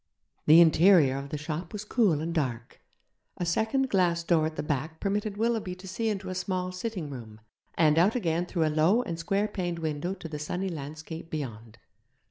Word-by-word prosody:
The 160 +3 +9
interior 165 -4 +5
of 140 0 -8
the 150 - -3
shop 155 +3 -5
was 210 0 -5
cool 205 - +2
and 165 +1 -3
dark. 125 -7 -3 0.6
A 175 - -2
second 220 +10 +1
glass 175 -3 +2
door 165 -2 +2
at 160 - -7
the - - -3
back 150 +2 -3
permitted 205 +1 -2
Willoughby 220 -5 0
to 185 +1 -12
see 220 +5 -2
into 195 -3 -3
a - - -3
small 185 0 -2
sitting 185 -5 -5
room, 110 -5 -9 0.4
and 155 -1 +4
out 195 +7 +4
again 175 -6 0
through 170 -3 0
a 155 - 0
low 175 +11 +3
and 170 -6 -5
square 195 +5 0
paned 175 -4 -3
window 160 +3 -3
to 180 -3 -8
the 150 -2 -6
sunny 180 +5 -3
landscape 160 +1 -7
beyond. 115 -7 -6
170 Hz, 195 wpm, -28 LUFS, 155-195 Hz, 0.6 s, The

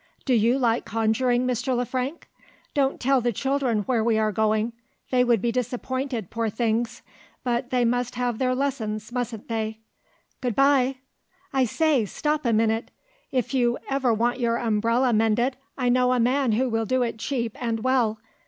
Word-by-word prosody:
Do 260 - +2
you 235 +2 +3
like 235 -3 +1
conjuring, 235 +3 +1
Mr. 250 +1 0
Le 245 - 0
Frank? 260 +6 -4 0.5
Don't 275 -1 +1
tell 265 0 +2
the 240 0 +1
children 265 -2 0
where 230 0 +1
we 225 -1 +2
are 215 -1 +2
going! 220 +2 +1 0.4
They 250 -1 +4
would 235 -4 +2
be 235 - +2
disappointed, 250 -2 -3
poor 230 -1 -1
things 230 +1 -1 0.4
but 245 0 -1
they 250 -2 +2
must 245 +1 0
have 245 -2 -1
their 255 -1 +1
lessons, 225 -6 -2
mustn't 240 -3 -4
they? 220 -1 -2 0.6
Good 245 -4 -1
bye! 270 -1 +4 0.6
I 265 -1 +3
say! 290 -1 +2
stop 300 +6 -1
a - - +3
minute. 225 +1 +1 0.4
If 255 -1 -1
you 245 -2 +2
ever 270 -3 +2
want 235 +3 +1
your 235 -1 +1
umbrella 230 +2 +1
mended, 225 +4 +2 0.2
I 250 -2 0
know 250 0 +3
a 250 - +1
man 250 0 +2
who 255 +4 +2
will 225 -2 0
do 255 +2 +2
it 230 -2 -3
cheap 235 -3 -2
and 225 -1 -1
well. 250 -4 +2
245 Hz, 175 wpm, -25 LUFS, 225-255 Hz, 0.6 s, They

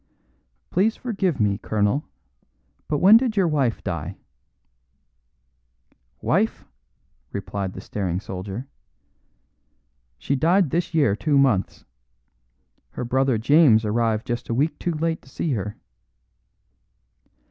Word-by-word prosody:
"Please 210 +5 +2
forgive 195 - -2
me, 100 -2 +1
colonel, 105 +7 0 0.8
but 150 - 0
when 200 +8 +8
did 230 -3 -1
your 190 -3 +4
wife 140 -7 0
die?" - - -4 2.1
"Wife!" 205 +7 0 0.7
replied 100 -1 -4
the - - -8
staring 90 -4 -3
soldier, 95 +6 -6 1.5
"she 140 - -1
died 165 +3 +2
this 170 0 -1
year 140 -11 +3
two 145 +5 +1
months. 130 -9 +1 1.0
Her - - -5
brother 130 0 +1
James 120 -2 +5
arrived 110 0 0
just 120 0 -4
a 115 - 0
week 150 +6 0
too 175 - -1
late 165 +1 -1
to - - -19
see 155 +3 -3
her." 105 -4 -3
135 Hz, 115 wpm, -23 LUFS, 105-165 Hz, 2.1 s, when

